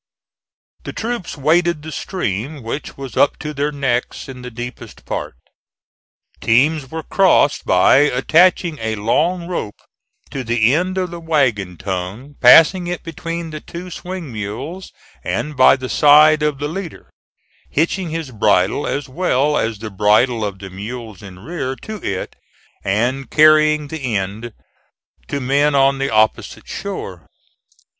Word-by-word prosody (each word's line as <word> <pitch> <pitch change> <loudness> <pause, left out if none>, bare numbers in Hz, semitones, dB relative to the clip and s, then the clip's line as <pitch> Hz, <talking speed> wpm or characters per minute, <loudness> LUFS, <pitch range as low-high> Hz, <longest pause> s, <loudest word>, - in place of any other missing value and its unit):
The - - -7
troops 230 -8 -4
waded 160 +2 +2
the 155 - -7
stream, 140 - -4
which 115 +6 -6
was 135 -4 -8
up - - +3
to 150 - -6
their 145 +1 -1
necks 135 -4 -2
in 130 -2 -9
the 125 - -7
deepest 120 +1 -9
part. - - -4 1.0
Teams 135 +4 +2
were 160 +1 -5
crossed 185 -6 +2
by 90 +7 +5
attaching 155 +4 +3
a 110 -1 -2
long 165 - 0
rope 140 - -4 0.5
to 135 - -4
the 120 0 +2
end 185 +4 0
of 180 -2 -1
the 170 - -7
wagon 125 - 0
tongue 95 - -5
passing 165 +8 +7
it 175 0 -4
between 165 0 -5
the 155 -1 -7
two 180 +2 -9
swing 180 -7 -7
mules 125 - -6 0.3
and 150 0 -3
by 130 0 +6
the 130 -1 -6
side 150 +3 +6
of 150 -2 0
the 145 +2 -3
leader, 170 +1 -7 0.6
hitching 170 +3 0
his 160 -4 -5
bridle 105 +1 +1
as 140 -1 -3
well 150 -1 +1
as 115 -5 -1
the 110 +1 -7
bridle 105 +4 +2
of 100 -2 -3
the 95 0 -10
mules 110 +2 -8
in 95 -3 -11
rear 135 - -4
to 215 +9 -8
it, 95 -1 -4 0.5
and 120 +7 -1
carrying 155 -1 +4
the 135 -8 -3
end 105 +5 -3 0.8
to 140 - -3
men 140 +3 +2
on 135 0 +3
the 135 0 -1
opposite 110 0 0
shore. 95 - -6
140 Hz, 150 wpm, -19 LUFS, 115-160 Hz, 1.0 s, passing